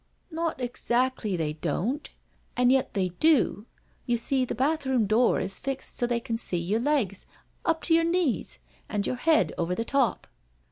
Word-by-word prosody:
" - - -42
Not 325 -2 -2
exactly 245 -4 -1
they 155 -2 -1
don't, 185 - -2 0.5
an' 250 0 +4
yet 265 -3 +1
they 185 -2 +1
do. 270 -8 +3 0.4
You 240 -1 +2
see 260 +3 +1
the - - -4
bath 290 +6 +1
room 255 -4 +2
door 225 +4 +3
is 190 0 -3
fixed 270 0 -5
so 240 - +1
they 240 -1 0
can 230 -1 -3
see 180 - -2
your 185 +6 0
legs 245 -8 0 0.4
up 325 -1 +1
to 330 - +2
your 330 0 +5
knees, 330 - 0 0.3
and 205 -2 -1
your 250 - -2
head 315 +5 +3
over 175 +1 0
the 230 - -2
top." 275 -2 +1
245 Hz, 185 wpm, -27 LUFS, 205-280 Hz, 0.5 s, your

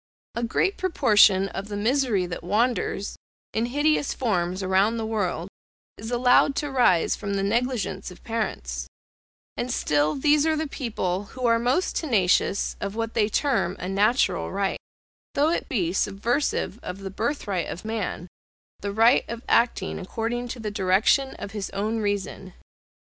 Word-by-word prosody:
A 235 - -3
great 240 - 0
proportion 210 - +4
of 195 +1 -6
the 205 -1 -5
misery 230 -3 +1
that 175 -1 -6
wanders, 210 0 0 0.4
in 225 +2 0
hideous 290 +3 +1
forms 185 -5 -1
around 190 +5 +2
the 225 - -2
world, 200 -6 -2 0.5
is 220 +2 -8
allowed 250 +3 +4
to 295 -2 -2
rise 240 -11 +3
from 200 -1 -4
the 195 - 0
negligence 235 +2 -1
of 180 - -14
parents; 60 - -3 0.7
and 245 +1 -3
still 150 -8 +1
these 295 +2 +3
are 315 - +2
the 315 +1 -1
people 205 -9 -3
who 255 +5 -6
are 230 -1 +4
most 255 +10 0
tenacious 200 - +1
of 200 +1 -3
what 225 0 -3
they 215 -2 +2
term 230 - +1
a 180 - -5
natural 210 +7 +1
right, 195 0 -1 0.6
though 290 +3 +3
it - - -2
be 185 - 0
subversive 220 +4 -1
of 180 +2 -7
the 195 -1 -6
birth 235 +6 -2
right 185 -5 -1
of 180 - -7
man, 215 -5 -3 0.5
the 200 - -3
right 225 +4 +5
of 235 +1 -6
acting 230 -5 +1
according 230 +5 -3
to 240 - -6
the 215 -2 -4
direction 205 +7 +2
of 200 - -7
his 205 -2 -4
own 215 +3 -1
reason. 200 -2 -3
220 Hz, 160 wpm, -25 LUFS, 195-245 Hz, 0.7 s, right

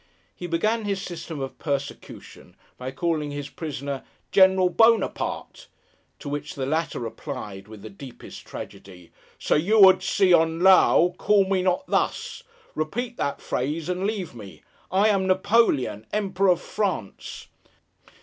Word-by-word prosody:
He 175 - -6
began 215 +7 0
his 200 -1 -1
system 170 -4 -7
of 135 - -6
persecution, 140 -2 -6 0.2
by 125 +1 -6
calling 150 +2 -2
his 145 0 -6
prisoner 140 -2 -5 0.3
'General 190 -1 +5
Buonaparte;' 225 +5 +1 0.5
to 150 - -10
which 145 +1 -5
the 135 - -3
latter 160 +3 -1
replied, 115 -5 -7
with 105 -2 -12
the - - -8
deepest 140 -10 -11
tragedy, 90 -3 -11 0.3
'Sir - - +1
Yew 195 +5 +6
ud 185 - +5
se 190 -1 +3
on 165 0 +3
Low, 180 -1 +5
call 200 -2 +3
me 190 -1 +1
not 185 +7 0
thus. - - -1 0.3
Repeat 235 +11 -3
that 140 - -2
phrase 150 +6 -3
and 180 +2 -1
leave 200 -8 -4
me! 105 -5 -12 0.3
I 200 +3 +3
am 195 -2 +1
Napoleon, 185 - +2
Emperor 195 -2 +1
of 175 - -8
France! 190 - -4
170 Hz, 140 wpm, -24 LUFS, 140-195 Hz, 0.5 s, Yew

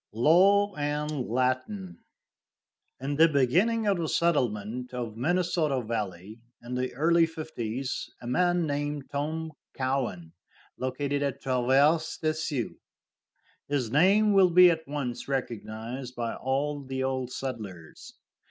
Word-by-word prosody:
LAW 195 - +4
AND 150 -2 -2
LATIN. 130 - -1 1.0
In 140 +2 -3
the 165 +1 +7
beginning 175 - +2
of 200 -3 +2
the 160 -2 -1
settlement 125 -6 0
of 120 -3 -4
the 115 - -10
Minnesota 165 -3 +1
valley, 105 -2 -5 0.2
in 120 +1 -7
the 125 0 -1
early 165 +4 +4
fifties, 135 -6 -4
a - - -11
man 175 +7 +2
named 145 -1 -3
Tom 155 +3 -3 0.2
Cowan 130 -11 -2 0.4
located 140 +2 -2
at 140 -2 -2
Traverse 135 +5 +2
des 155 -1 0
Sioux. 150 -7 -3 0.9
His 135 -6 -1
name 200 - +4
will 190 -2 +6
be 180 +1 +7
at 160 -2 -4
once 140 -4 -4
recognized 125 -1 -4
by 115 -1 -2
all 140 +3 -2
the 130 0 -3
old 130 -1 -2
settlers. 105 -12 -7
140 Hz, 125 wpm, -28 LUFS, 125-160 Hz, 1.0 s, the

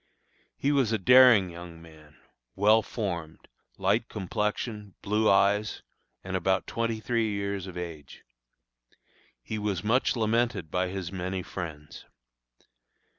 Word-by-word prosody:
He 140 - +1
was 135 -6 +2
a 110 - +2
daring 120 -3 +6
young 85 -1 -10
man, 80 -2 -16 0.4
well 105 +3 +5
formed, 85 -9 -5 0.3
light 100 +5 +1
complexion, 105 0 -3
blue 105 +2 +2
eyes, 100 +2 +2 0.4
and 95 0 -4
about 95 +1 +1
twenty 115 -1 -2
three 115 +1 0
years 100 -2 -3
of 90 - -8
age. 80 -5 -8 1.2
He 110 - -4
was 100 -4 -2
much 125 +6 +2
lamented 115 -6 0
by 90 0 0
his 95 -1 -5
many 95 0 -3
friends. 80 -6 -8
100 Hz, 125 wpm, -28 LUFS, 90-110 Hz, 1.2 s, daring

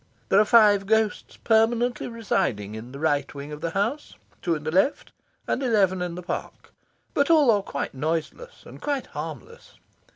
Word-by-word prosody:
There 195 - +5
are 215 - +5
five 205 -3 +5
ghosts 220 0 0
permanently 230 +2 +1
residing 120 - -2
in 110 +3 -8
the 135 - -8
right 145 -2 0
wing 140 +1 -7
of 150 0 -8
the 165 - -1
house, 220 - -2 0.3
two 170 -2 0
in 150 - -7
the 155 - -2
left, 190 - +1 0.3
and - - -1
eleven 200 -7 +2
in 175 -1 -3
the 180 - -7
park. 175 - -6 0.4
But 285 +2 +1
all 305 -7 +6
are 205 -2 +2
quite 140 - -5
noiseless 160 - -4
and - - -12
quite 285 -3 -2
harmless. 470 +1 -8
200 Hz, 175 wpm, -25 LUFS, 155-235 Hz, 0.4 s, all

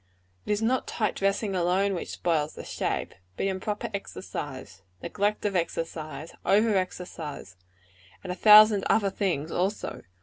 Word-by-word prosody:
It - - 0
is 210 +1 0
not 250 +3 +1
tight 215 - -1
dressing 195 0 0
alone 185 +3 +2
which 175 - -4
spoils 155 -3 -1
the - - -8
shape; - - -3 0.2
but - - -1
improper 195 +2 -3
exercise, 130 - -6 0.2
neglect 205 +1 -1
of 200 -2 0
exercise, 160 -3 -3
over 215 +2 +3
exercise 170 - -4 0.7
and 180 - -4
a - - -8
thousand 210 0 +8
other 200 -3 +3
things 170 -7 -1
also. 195 +4 -2
190 Hz, 140 wpm, -27 LUFS, 165-205 Hz, 0.7 s, thousand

